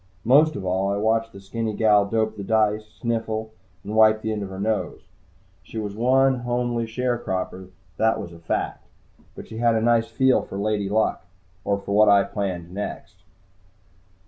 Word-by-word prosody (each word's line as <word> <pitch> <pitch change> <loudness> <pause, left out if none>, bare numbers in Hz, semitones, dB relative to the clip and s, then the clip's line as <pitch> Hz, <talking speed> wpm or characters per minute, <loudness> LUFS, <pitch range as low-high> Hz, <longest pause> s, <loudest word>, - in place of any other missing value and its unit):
Most 145 +6 +5
of 95 - -5
all, 95 +2 0
I 100 - -1
watched 110 +2 +1
the 100 - -11
skinny 110 +2 -4
gal 105 -2 +4
dope 110 0 0
the 100 - -6
dice, 110 0 +1
sniffle 110 -2 -3 0.3
and 105 - -6
wipe 110 0 +5
the 110 - -1
end 105 -1 -3
of 100 - -5
her 95 0 -8
nose. 110 +1 -2 0.6
She - - -10
was 105 -2 -4
one 130 +3 +3
homely 120 -1 -1
sharecropper, 110 -6 -3 0.3
that 110 0 +2
was 85 - -7
a 85 - -13
fact, 85 - -3 0.5
but - - -10
she 110 - -9
had 115 -1 +3
a - - +2
nice 115 0 +3
feel 130 -1 +2
for 95 - -8
Lady 100 -1 -1
Luck. 110 +2 0 0.4
Or 100 +1 0
for 100 0 -4
what 105 0 +6
I 100 -1 +6
planned 90 -5 -4
next. 100 -1 -6
110 Hz, 180 wpm, -23 LUFS, 100-115 Hz, 0.6 s, what